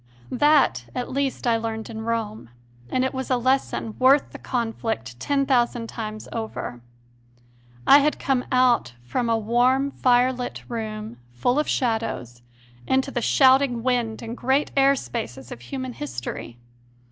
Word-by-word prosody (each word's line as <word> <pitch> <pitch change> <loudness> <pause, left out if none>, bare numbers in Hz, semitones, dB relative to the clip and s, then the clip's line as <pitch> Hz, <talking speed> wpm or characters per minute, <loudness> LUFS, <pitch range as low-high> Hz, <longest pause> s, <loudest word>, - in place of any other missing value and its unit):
That 280 - +3
at 250 - -3
least 275 0 -2
I 235 -1 +3
learned 225 -1 -4
in 220 -1 -7
Rome, 220 - -3 0.4
and 255 - +1
it 260 - -2
was 260 0 -4
a 255 - +3
lesson 255 -3 0
worth 270 +3 +4
the - - -10
conflict 225 - -3
ten 275 - +1
thousand 240 -3 +1
times 215 -2 -6
over. 220 - -5 1.0
I 280 - +8
had 300 +1 +1
come 260 -2 0
out 250 - +3
from 230 - -2
a 230 - +3
warm 250 +5 +2
firelit 250 0 +1
room, 215 - -5 0.2
full 245 - +1
of 300 - 0
shadows, 225 - -2 0.5
into 265 +1 +1
the 245 - -2
shouting 260 -2 +4
wind 240 -3 0
and 230 +1 -5
great 265 +4 +1
air 275 0 +5
spaces 125 - -6
of 120 - -8
human 260 - -5
history. 120 - -6
240 Hz, 145 wpm, -24 LUFS, 220-260 Hz, 1.0 s, I